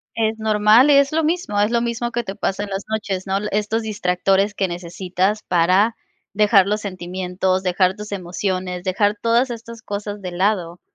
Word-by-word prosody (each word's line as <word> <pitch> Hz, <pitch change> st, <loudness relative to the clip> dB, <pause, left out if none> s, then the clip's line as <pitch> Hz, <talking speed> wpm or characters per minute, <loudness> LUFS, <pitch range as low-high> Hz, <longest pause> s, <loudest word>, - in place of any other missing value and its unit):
Es 220 Hz, -1 st, 0 dB
normal 220 Hz, +4 st, +5 dB
y -, -, +6 dB
es 280 Hz, 0 st, +4 dB
lo 320 Hz, 0 st, +1 dB
mismo, 320 Hz, -10 st, -1 dB
es 205 Hz, +2 st, +3 dB
lo 235 Hz, 0 st, +2 dB
mismo 235 Hz, 0 st, -2 dB
que 240 Hz, -, -1 dB
te 195 Hz, -, -6 dB
pasa 200 Hz, +1 st, -2 dB
en 205 Hz, -, -8 dB
las 195 Hz, 0 st, -4 dB
noches, 205 Hz, -4 st, -3 dB
¿no?, 190 Hz, 0 st, 0 dB
el 210 Hz, +1 st, -4 dB
estos 210 Hz, +2 st, 0 dB
distractores 195 Hz, -1 st, 0 dB
que 195 Hz, -2 st, 0 dB
necesitas 180 Hz, +4 st, -2 dB
para 185 Hz, +6 st, +3 dB, 0.4 s
dejar 205 Hz, -2 st, +4 dB
los 210 Hz, +1 st, -1 dB
sentimientos, 185 Hz, 0 st, -2 dB
dejar 185 Hz, 0 st, +2 dB
tus 210 Hz, 0 st, -9 dB
emociones, 185 Hz, -1 st, -3 dB
dejar 205 Hz, +2 st, +1 dB
todas 235 Hz, +3 st, +3 dB
estas 230 Hz, 0 st, -8 dB
cosas 205 Hz, 0 st, -5 dB
de 185 Hz, -2 st, -5 dB
lado 180 Hz, -2 st, -1 dB
205 Hz, 185 wpm, -20 LUFS, 185-220 Hz, 0.4 s, y